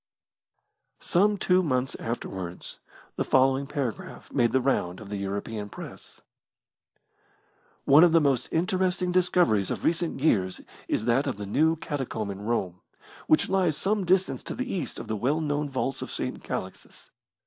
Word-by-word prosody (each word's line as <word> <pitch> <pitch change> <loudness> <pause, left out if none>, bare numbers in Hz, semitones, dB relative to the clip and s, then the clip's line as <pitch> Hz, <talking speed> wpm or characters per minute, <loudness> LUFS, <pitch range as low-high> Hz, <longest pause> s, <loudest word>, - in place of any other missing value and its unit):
Some 205 +3 +2
two 185 -1 +3
months 130 -6 0
afterwards 95 -6 -5 0.4
the - - +1
following 135 +1 +3
paragraph 135 -6 -5
made 120 -1 +3
the 130 - +3
round 110 -9 0
of 110 -3 -10
the 100 - -2
European 100 +2 -4
Press: - - -10 1.6
One 145 +4 +7
of 175 - +6
the 165 - +6
most 140 -5 +1
interesting 180 +1 0
discoveries 175 - +3
of - - -4
recent 170 -2 0
years 95 -11 +1 0.3
is 110 - -1
that 125 +4 +2
of 130 - -2
the 105 - -5
new 155 +11 +2
catacomb 130 -9 -4
in 100 0 -8
Rome, 95 -5 -2 0.5
which 155 - +4
lies 180 -6 +1
some 205 0 0
distance 185 +1 +1
to - - -5
the 255 +1 -3
east 180 -5 -3
of - - -7
the 110 - -2
well 135 +9 0
known 150 -1 -1
vaults 135 0 -2
of - - -5
St. - - -4
Calixtus. - - -7
135 Hz, 160 wpm, -27 LUFS, 110-175 Hz, 1.6 s, One